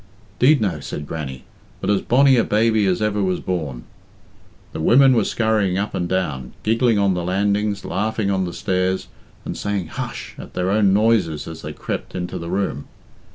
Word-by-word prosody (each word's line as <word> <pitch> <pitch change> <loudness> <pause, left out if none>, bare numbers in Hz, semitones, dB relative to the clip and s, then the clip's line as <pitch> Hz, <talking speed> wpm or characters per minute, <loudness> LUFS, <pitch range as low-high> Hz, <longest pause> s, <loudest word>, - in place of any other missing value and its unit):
"'Deed 140 +3 +5
no," 95 -8 -1
said 75 +1 -6
Grannie, 70 -5 -6 0.4
"but - - -4
as 100 - +2
bonny 135 +2 +4
a 115 - +4
baby 110 -1 +2
as 95 +2 +1
ever 105 -1 0
was 95 -2 0
born." 75 -9 -3 0.9
The - - -5
women 130 - +6
were 115 -3 +3
scurrying 105 -5 +1
up 105 +2 -2
and 90 -1 -2
down, 70 -9 -2
giggling 115 +1 +2
on 100 -1 +3
the 90 -1 -2
landings, 100 +2 0
laughing 110 0 -1
on 95 -1 0
the 90 - -4
stairs, 95 0 -1 0.4
and - - -4
saying 100 -5 -3
hush - - -6
at - - -10
their 90 +1 0
own 100 -1 +4
noises 100 -7 +2
as 80 -1 -8
they 75 - -6
crept - - -5
into 90 -1 -4
the 85 - -6
room. 95 -6 -2
95 Hz, 185 wpm, -21 LUFS, 90-110 Hz, 0.9 s, women